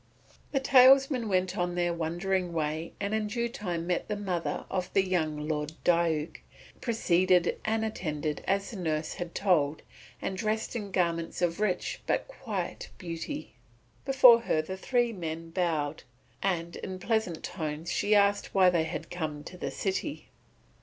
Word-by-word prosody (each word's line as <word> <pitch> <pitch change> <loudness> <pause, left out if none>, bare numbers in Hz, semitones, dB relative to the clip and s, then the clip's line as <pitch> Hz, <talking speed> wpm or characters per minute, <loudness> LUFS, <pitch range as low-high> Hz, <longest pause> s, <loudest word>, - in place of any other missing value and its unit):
The 270 - +2
talesmen 265 -2 +6
went 185 -1 +1
on 175 0 -1
their 175 -1 +1
wondering 175 +2 -1
way 155 0 -2
and 200 +1 -2
in 220 -1 0
due 235 +2 -1
time 175 -8 -4
met 175 0 -1
the 210 - -1
mother 185 -5 -2
of 185 -1 -3
the 195 - +3
young 155 -4 -1
Lord 150 0 -2
Diuk, 165 -3 +2 0.4
preceded 185 -6 +2
and 220 0 +1
attended 155 -8 -3
as 195 +1 0
the 220 - -7
nurse 155 -3 -1
had 175 -1 -6
told, 160 -7 +2 0.4
and 190 - -3
dressed 215 +4 -2
in 210 -4 -3
garments 170 -3 -1
of 170 +1 +1
rich 190 -4 -1
but - - 0
quiet - - -5
beauty. 175 - -6 0.5
Before 255 -4 +7
her 155 -9 +1
the 190 +4 -5
three 240 +4 +1
men 165 -3 -5
bowed, 160 -4 -1 0.4
and 170 -3 -1
in 190 -1 -5
pleasant 200 -4 -1
tones 160 -1 -4
she 210 +1 +2
asked 200 0 +2
why 185 -2 +6
they 165 -2 +2
had - - -5
come 155 -4 -4
to 180 - -9
the 180 - -4
city. 200 +10 -3
180 Hz, 160 wpm, -29 LUFS, 165-210 Hz, 0.5 s, Before